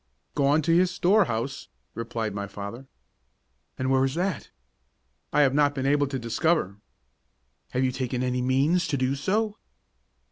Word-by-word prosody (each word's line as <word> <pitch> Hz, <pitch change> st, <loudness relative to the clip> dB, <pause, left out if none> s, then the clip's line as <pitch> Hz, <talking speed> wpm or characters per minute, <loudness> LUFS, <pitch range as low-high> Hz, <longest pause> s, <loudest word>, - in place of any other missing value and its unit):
"Gone 145 Hz, +2 st, +2 dB
to 165 Hz, +2 st, +3 dB
his 180 Hz, +1 st, +4 dB
storehouse," 160 Hz, -, +1 dB, 0.3 s
replied 115 Hz, -2 st, -3 dB
my 100 Hz, 0 st, -4 dB
father. 105 Hz, +7 st, -8 dB, 0.9 s
"And 130 Hz, 0 st, -1 dB
where 130 Hz, 0 st, +4 dB
is 135 Hz, +1 st, 0 dB
that?" 185 Hz, +2 st, -2 dB, 0.8 s
"I 150 Hz, -, +3 dB
have 135 Hz, -2 st, +4 dB
not 145 Hz, 0 st, +3 dB
been 135 Hz, -1 st, -2 dB
able 145 Hz, +1 st, +3 dB
to 135 Hz, 0 st, -3 dB
discover." 120 Hz, -, 0 dB, 0.9 s
"Have 130 Hz, -, 0 dB
you 130 Hz, -, +2 dB
taken 125 Hz, -1 st, -2 dB
any 125 Hz, 0 st, 0 dB
means 140 Hz, +7 st, +2 dB
to 145 Hz, -2 st, -1 dB
do 130 Hz, +1 st, +1 dB
so?" 210 Hz, +9 st, -1 dB
135 Hz, 150 wpm, -26 LUFS, 125-160 Hz, 0.9 s, his